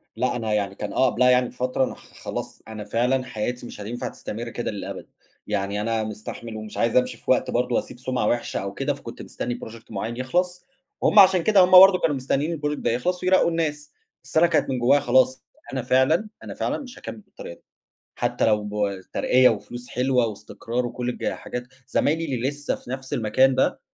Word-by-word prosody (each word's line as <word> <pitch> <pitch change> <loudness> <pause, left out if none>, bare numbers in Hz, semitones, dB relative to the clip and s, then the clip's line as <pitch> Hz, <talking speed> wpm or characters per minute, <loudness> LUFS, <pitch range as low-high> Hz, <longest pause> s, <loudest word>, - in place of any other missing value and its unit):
لأ، 130 - 0
أنا 110 -3 -2
يعني 100 -2 -1
كان 105 0 -5
آه، 130 - +3
قبلها 125 +1 +3
يعني 125 0 +3
بفترة 125 +1 -1
أنا - - -2
ح - - -20
خلاص - - -6
أنا 110 -1 -7
فعلًا 125 +5 +1
حياتي 125 +1 -4
مش 110 - -9
هتنفع 115 +4 -4
تستمر 115 +2 -6
كده 120 +1 -3
للأبد، 105 - -7 0.4
يعني 100 0 -1
أنا 115 0 0
مستحمل 110 +1 -7
ومش 110 0 -8
عايز 115 - +1
أمشي 125 0 +2
في - - -2
وقت 130 - +2
برضه 125 0 0
وأسيب 120 - -3
سمعة 125 -4 -1
وحشة 120 - -1
أو 100 0 -5
كده، - - -1
فكنت - - -10
مستني 120 0 -5
Project 115 +1 -12
مُعيّن 115 +2 -4
يخلص، 175 +8 -1 0.4
وهُم 210 - +5
عشان 185 -3 +7
كده 210 +2 +4
هُم 180 - +2
برضه 185 0 +9
كانوا 155 -3 +1
مستنيين 140 +5 -1
الProject 150 0 -2
ده - - 0
يخلص 180 +11 -1
ويرقّوا 185 -1 +4
الناس، 150 -3 -2 0.3
بس - - -4
أنا 170 +2 +6
كانت 165 -4 +1
من 130 -2 -1
جوايا 125 +4 +4
خلاص، 130 -1 +2 0.3
أنا 130 - -1
فعلًا، 130 - +2
أنا - - -7
فعلًا - - -2
مش 260 -2 -10
هاكمل 230 - -7
بالطريقة 195 - -11
دي، - - -28 0.5
حتى - - 0
لو 105 -1 +1 0.4
ترقية 125 0 +4
وفلوس 120 +3 -5
حلوة 125 -1 +1
واستقرار، 115 +3 -4
وكُلّ 125 0 -4
الجا 125 - -2
الحاجات 125 0 -6 0.2
زمايلي 155 +5 +1
اللي 130 -4 -1
لسّه 145 0 -3
في - - -13
نفس 130 0 -6
المكان 130 +4 +3
ده، - - +1
125 Hz, 200 wpm, -24 LUFS, 115-145 Hz, 0.5 s, برضه